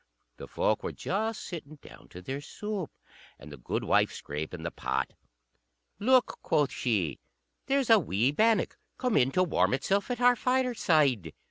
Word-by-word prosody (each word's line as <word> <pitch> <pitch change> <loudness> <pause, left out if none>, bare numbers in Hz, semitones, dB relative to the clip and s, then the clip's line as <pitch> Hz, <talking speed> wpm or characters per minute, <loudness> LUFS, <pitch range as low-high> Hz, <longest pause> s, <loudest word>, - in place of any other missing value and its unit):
The - - -9
folk - - 0
were - - -4
just 220 +3 -2
sitting 155 -4 -8
down 145 - -15
to 90 - -11
their 135 +7 -4
soup, 200 +2 -5 0.5
and 75 - -12
the 75 - -9
goodwife 60 - +1
scraping 80 +3 -6
the 85 - -3
pot. - - -2 0.9
"Look," 255 +3 +3
quoth 145 -4 +1
she, 95 - -1 0.5
"there's 270 -3 +2
a 225 - +8
wee 120 - +1
bannock 220 +7 +2 0.2
come 250 -3 0
in 130 0 +4
to 185 - +3
warm 165 -6 +2
itself 195 - 0
at 245 -1 -2
our 245 0 +5
fireside." 165 - +1
160 Hz, 155 wpm, -29 LUFS, -, 0.9 s, a